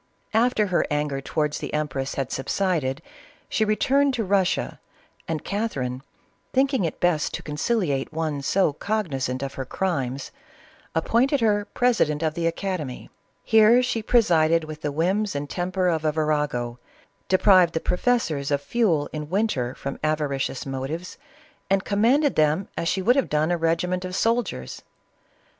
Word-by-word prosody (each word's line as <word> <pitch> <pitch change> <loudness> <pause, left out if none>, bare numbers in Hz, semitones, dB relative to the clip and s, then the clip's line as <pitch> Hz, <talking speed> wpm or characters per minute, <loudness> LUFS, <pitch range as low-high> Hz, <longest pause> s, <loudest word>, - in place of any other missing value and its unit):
After 225 -1 +3
her - - +3
anger 150 -2 -1
towards 150 +1 -1
the - - -5
empress 140 -3 -2
had 135 -2 -3
subsided, 155 -1 -1 0.4
she 220 - 0
returned 270 +6 +2
to 230 - -1
Russia, 190 -2 0 0.5
and 160 -2 -3
Catherine, 135 - -2 0.5
thinking 265 -6 +2
it 160 - -4
best 175 -4 +1
to - - -7
conciliate 150 - -1
one 155 -3 -2
so 170 +2 +2
cognizant 140 - -2
of 135 0 -4
her 135 - -4
crimes, 135 -4 -2 0.6
appointed 245 - +2
her 205 -2 +2
president 165 -12 +2
of 155 -1 0
the 165 +1 -1
academy. 165 -6 -4 0.3
Here 225 +2 +5
she 245 -2 -1
presided 165 -8 +3
with 155 0 -8
the 145 - -2
whims 190 +6 0
and 145 +1 -3
temper 180 +3 -1
of 160 -3 0
a 155 - +2
virago, 150 -6 -1 0.5
deprived 185 -3 +5
the - - +2
professors 180 - 0
of 145 -1 +1
fuel 165 -2 +1
in 150 -1 -5
winter, 165 - 0
from 140 - -6
avari 150 -3 -1
cious 130 - -3
motives, 135 +6 -5 0.5
and 195 0 +2
commanded 245 +8 +3
them 155 +5 +2
as 165 - -2
she 190 +2 0
would 245 +6 +4
have 275 - +1
done 155 +3 +1
a - - +3
regiment 180 +3 0
of 185 0 -5
soldiers. 225 - -1
165 Hz, 150 wpm, -24 LUFS, 145-205 Hz, 0.6 s, Here